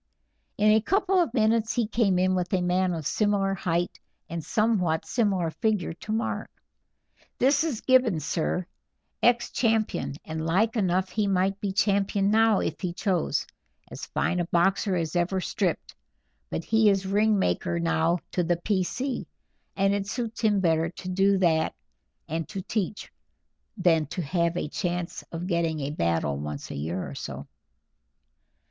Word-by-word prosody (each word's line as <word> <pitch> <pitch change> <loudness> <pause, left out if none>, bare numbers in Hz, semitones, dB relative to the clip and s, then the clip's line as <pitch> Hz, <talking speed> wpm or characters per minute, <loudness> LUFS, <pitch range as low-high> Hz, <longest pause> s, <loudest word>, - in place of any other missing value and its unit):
In 215 +1 +4
a 220 +1 +5
couple 385 - +2
of 330 - 0
minutes 225 -1 +2
he 240 -2 +1
came 210 -3 +1
in 185 +1 +2
with 180 -1 -1
a 185 - +2
man 180 +1 +1
of 160 -3 -5
similar 200 +1 +1
height 175 -2 -1 0.3
and 165 -1 -5
somewhat 190 -8 +1
similar 195 -8 0
figure 210 -5 -1
to 210 +5 -8
Mark. 225 +1 -2 0.9
"This 285 +4 +3
is 295 -9 -2
Gibbons, 235 - +3
sir, 175 +2 -1 0.6
ex 240 0 +3
champion, 220 - 0
and 160 0 -4
like 195 +8 +1
enough 185 -3 +1
he 210 -2 0
might 195 +1 +1
be 200 - -2
champion 200 0 +1
now 220 -1 +4
if 155 - -3
he 180 -3 -2
chose; 185 -2 0 0.5
as - - -7
fine 180 - 0
a 175 - 0
boxer 190 +3 +2
as 165 -1 -2
ever 175 +2 +1
stripped, 185 -1 -2 0.6
but 165 - -3
he 220 +1 +4
is 195 -1 +1
ring 210 +2 +2
maker 85 - 0
now 85 - +2
to 180 - 0
the 170 0 +1
P. 190 +2 0
C. 255 +8 -3 0.5
and 195 0 +2
it 200 -1 -2
suits 230 +1 -4
him 210 -3 +3
better 165 -2 +2
to 180 +1 -8
do 195 +2 +3
that 160 -4 +2 0.5
and 160 +1 -3
to 195 -3 -5
teach, 210 0 -3 0.7
than 165 -5 +3
to 175 +4 -4
have 170 +2 0
a - - -2
chance 175 +1 -3
of 170 +1 -4
getting 170 -3 0
a 140 +1 -2
battle 85 - 0
once 75 0 -6
a - - -5
year 80 +6 -3
or - - -7
so." - - -6
190 Hz, 165 wpm, -26 LUFS, 170-215 Hz, 0.9 s, a